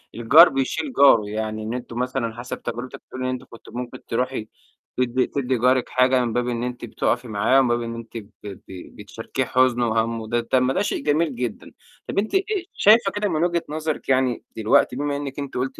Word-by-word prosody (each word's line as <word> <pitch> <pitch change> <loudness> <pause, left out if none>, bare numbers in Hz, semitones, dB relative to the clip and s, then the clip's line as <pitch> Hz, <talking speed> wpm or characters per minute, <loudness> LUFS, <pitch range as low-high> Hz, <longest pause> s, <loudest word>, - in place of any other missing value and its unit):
الجار 140 +9 +7
بيشيل 135 - -2
جاره 110 -7 +5
يعني 110 0 -3
إن 110 +2 -4
أنتم 125 -1 -6
مثلًا، 125 -3 -2
حسب 120 +1 -6
تجربتِك 120 +2 -6
بتقولي 130 0 -6
إن - - 0
أنتِ 130 -1 -4
كنتِ 115 - -15
ممكن 125 +1 -7
ترُوحي 125 -2 -2 0.5
تدّي 125 0 +1
تدّي 130 -2 -1
جارِك 125 +2 +2
حاجة 130 -1 +3
من 115 - -3
باب 125 0 0
إن 120 -1 -2
أنتِ 125 -1 -5
بتُقفي 120 +2 -1
معاه 110 +5 +3
ومن 130 - +3
باب 120 0 +1
إن 115 0 -5
أنتِ 115 0 -8
ب 110 - -6 0.2
ب 100 -2 -8 0.3
بتشاركيه 110 +5 -4
حُزنه 125 -2 +2
وهَمُّه، 115 0 -1
ده 120 +1 0
طَب 125 +2 +1
ما 130 +1 +1
ده 195 - 0
شيء - - -2
جميل 150 -2 +1
جدًا. 120 -3 -5 0.4
طَب - - -4
أنتِ 215 - -2
إيه، 390 -1 0
شايفة 210 -1 +5
كده 205 +1 -1
من 160 0 0
وجهة 170 -1 0
نظرِك 155 -2 -4
يعني 130 -2 +1
دلوقتي 110 +3 +3
بما 145 +1 -2
إنِّك 140 -1 -6
أنتِ 140 -3 -5
قُلتِ 130 +1 -3
125 Hz, 210 wpm, -23 LUFS, 115-140 Hz, 0.5 s, الجار